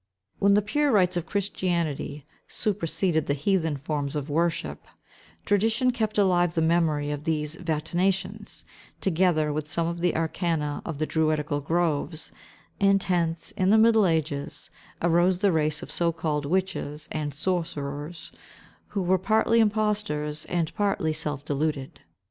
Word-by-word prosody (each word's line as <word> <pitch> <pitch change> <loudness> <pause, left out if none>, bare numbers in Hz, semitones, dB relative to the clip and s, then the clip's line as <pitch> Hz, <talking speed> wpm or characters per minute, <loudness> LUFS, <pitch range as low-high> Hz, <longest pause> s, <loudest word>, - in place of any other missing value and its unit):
When 200 0 +5
the 205 - +3
pure 290 +7 +1
rites 185 -4 +3
of 175 -1 -2
Christianity 170 -7 -2 0.2
seperseded 180 -5 0
the 140 - +1
heathen 160 -1 0
forms 145 0 -3
of 145 0 -3
worship, 160 - -1 0.6
tradition 225 +5 +2
kept 220 -3 -2
alive 175 -4 +3
the 165 - +2
memory 160 -3 +2
of 145 0 -4
these 155 -1 -1
vaticinations, 185 +5 -2 0.4
together 165 -4 +2
with 150 0 -3
some 165 +2 0
of 170 +1 -3
the 175 0 +1
arcana 160 -2 -1
of 165 -4 -4
the 155 - 0
druidical 155 -2 0
groves; 160 0 -1 0.5
and 195 -1 +4
hence, 170 -3 -1
in 185 0 0
the 215 - +6
middle 220 -2 +5
ages, 155 -4 -2 0.3
arose 175 +2 +3
the 200 +1 +2
race 155 0 +1
of - - -8
so 170 -1 +1
called 155 -3 -2
witches 155 -4 -2
and 150 -2 -2
sorcerers, 150 -1 -3 0.6
who 200 -2 -2
were 185 +1 +2
partly 220 +4 +3
impostors, 210 -9 0
and 170 -3 -1
partly 195 -6 0
self 150 -3 -4
deluded. 145 -2 -2
165 Hz, 145 wpm, -26 LUFS, 150-190 Hz, 0.6 s, the